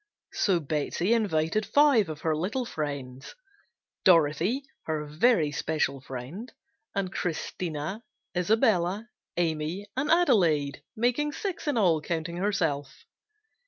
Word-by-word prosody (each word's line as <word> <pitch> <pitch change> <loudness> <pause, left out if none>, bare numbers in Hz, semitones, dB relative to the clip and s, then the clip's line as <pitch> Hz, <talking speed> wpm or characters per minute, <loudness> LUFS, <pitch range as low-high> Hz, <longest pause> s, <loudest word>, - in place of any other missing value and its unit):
So 190 -4 +2
Betsey 155 +7 0
invited 205 -3 +1
five 270 - +4
of 155 -1 -6
her 160 -1 +1
little 205 +11 -2
friends: 140 - -5 0.7
Dorothy, 170 - +4 0.2
her 155 -1 -2
very 155 +1 +3
special 145 -3 -1
friend, 135 - -7 0.4
and 195 -1 -2
Christina, 170 +3 -3 0.3
Isabella, 205 +1 +2 0.3
Amy 165 +3 -1
and 275 +3 -1
Adelaide, 170 - +3
making 245 +6 +1
six 380 -2 -4
in 290 - +1
all, 170 -7 +3
counting 170 +1 -3
herself. 160 -8 -1
175 Hz, 110 wpm, -28 LUFS, 155-220 Hz, 0.7 s, five